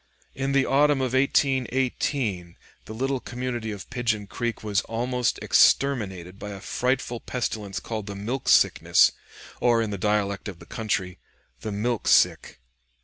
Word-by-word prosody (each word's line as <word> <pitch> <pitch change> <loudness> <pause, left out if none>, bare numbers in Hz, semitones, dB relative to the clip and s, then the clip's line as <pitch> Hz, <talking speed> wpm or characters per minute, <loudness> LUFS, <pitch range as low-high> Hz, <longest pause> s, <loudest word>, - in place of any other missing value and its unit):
In 135 +1 -2
the 140 -1 +3
autumn 145 +1 +3
of 130 -1 -1
1818 130 - 0 0.3
the 110 - -8
little 135 +2 -1
community 120 -2 -4
of 100 -2 -7
Pigeon 115 -5 -1
Creek 120 +4 -4
was 105 -1 +1
almost 125 +1 -1
exterminated 95 -9 +2
by 105 - -6
a 100 -1 -7
frightful 125 +3 -1
pestilence 105 -6 -4
called 110 -3 -5
the 100 - -5
milk 120 +7 -3
sickness, - - +5 0.5
or, 120 -1 +3
in 110 -2 -1
the 100 - -4
dialect 105 0 0
of 95 -4 -7
the 85 - -14
country, 100 -4 -3 0.4
"the 110 - -5
milk 110 +3 -2
sick." - - +3
115 Hz, 145 wpm, -25 LUFS, 100-130 Hz, 0.5 s, sickness